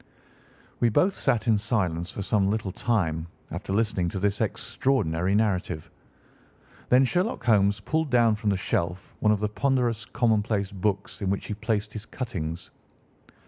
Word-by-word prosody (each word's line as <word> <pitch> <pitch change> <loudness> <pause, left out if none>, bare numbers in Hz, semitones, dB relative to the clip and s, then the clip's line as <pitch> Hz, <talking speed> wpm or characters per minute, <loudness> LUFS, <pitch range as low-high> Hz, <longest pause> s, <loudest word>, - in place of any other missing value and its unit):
We 120 - +4
both 185 - +3
sat 120 - 0
in 110 -2 +4
silence 90 -6 -1
for 100 - -5
some 100 -1 +2
little 105 -2 -1
time 85 -8 0 0.2
after - - -5
listening 100 -4 +1
to 95 - -4
this 100 +2 0
extraordinary 105 -6 0
narrative. 95 -7 0 1.0
Then 130 +2 +6
Sherlock 180 - 0
Holmes 105 -3 +3
pulled 160 +7 -1
down 120 -3 +4
from 105 0 -1
the 100 - +2
shelf 90 0 -2
one 105 - +3
of 105 -1 +1
the 105 - +2
ponderous 120 -2 0
commonplace 105 -4 +1
books 100 +1 -2
in 95 - 0
which 100 0 -1
he - - -3
placed 105 0 -2
his 110 0 -7
cuttings. 85 -9 -5
105 Hz, 155 wpm, -26 LUFS, 95-115 Hz, 1.0 s, Then